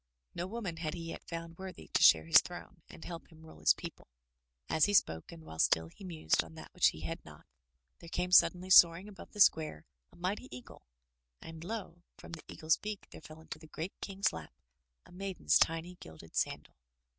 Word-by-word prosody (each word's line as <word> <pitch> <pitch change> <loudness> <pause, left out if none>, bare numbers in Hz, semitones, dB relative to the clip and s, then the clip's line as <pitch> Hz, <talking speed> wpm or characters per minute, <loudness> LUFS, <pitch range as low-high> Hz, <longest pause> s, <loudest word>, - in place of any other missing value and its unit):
No 175 - -4
woman 195 -5 -5
had 155 -1 -3
he 165 -1 -6
yet - - -8
foimd 165 0 -7
worthy 185 - -8
to - - +1
share 80 -1 +7
his 80 - +8
throne 175 0 -10
and - - -11
help 170 -2 -7
him 160 0 -16
mle 160 - -14
his - - +5
people. - - -9 0.6
As 160 -1 +3
he 205 - +1
spoke 80 - +2
and 165 -1 -11
while 80 - -10
still 80 0 +3
he 195 - -15
mused 160 - 0
on 80 -1 -14
that - - -11
which - - +4
he 80 - -2
had 80 - -5
not, - - -14 0.5
there 170 - -12
came 180 +1 -2
suddenly 185 0 +5
soaring 175 +2 +7
above 205 -2 -12
the 210 - -10
square 155 - +3 0.3
a - - -20
mighty 185 +4 -3
eagle, 125 0 -11 0.6
and 160 - -10
lo! 180 -3 -6 0.2
from - - -12
the 165 - -7
eagle's 160 +1 +1
beak 210 -1 -7
there - - -11
fell 155 0 -12
into 160 - -9
the 160 - -14
great 165 +4 -6
King's 195 0 -1
lap 80 -6 -9 0.5
a - - -18
maiden's 180 - +1
tiny 165 +2 0
gilded 80 0 -13
sandal. - - -2
165 Hz, 205 wpm, -33 LUFS, 155-185 Hz, 0.6 s, his